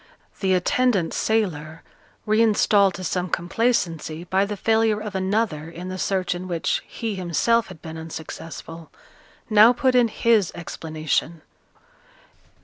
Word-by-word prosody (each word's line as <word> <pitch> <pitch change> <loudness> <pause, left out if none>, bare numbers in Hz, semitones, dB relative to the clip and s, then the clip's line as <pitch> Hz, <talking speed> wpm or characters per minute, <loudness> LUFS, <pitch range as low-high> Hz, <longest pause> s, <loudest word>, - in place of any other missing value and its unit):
The 190 -2 +2
attendant 195 -1 +1
sailor, 165 -8 -1 0.4
reinstalled 210 -3 +3
to 185 - -7
some 180 0 -2
complacency 170 -4 -1
by 190 +3 +1
the 205 0 -5
failure 220 +1 +2
of 210 -1 -6
another 190 -5 -1
in 175 +2 -8
the 185 0 -5
search 185 -2 0
in 180 +1 -6
which 170 -2 -1
he 225 -2 -4
himself 195 +6 +1
had 185 -5 -13
been 160 -1 -7
unsuccessful, 160 0 -8 0.6
now 215 +2 +7
put 260 +1 +1
in 245 -2 +5
his 220 -4 +2
explanation. 160 -1 -3
185 Hz, 130 wpm, -23 LUFS, 165-220 Hz, 0.6 s, now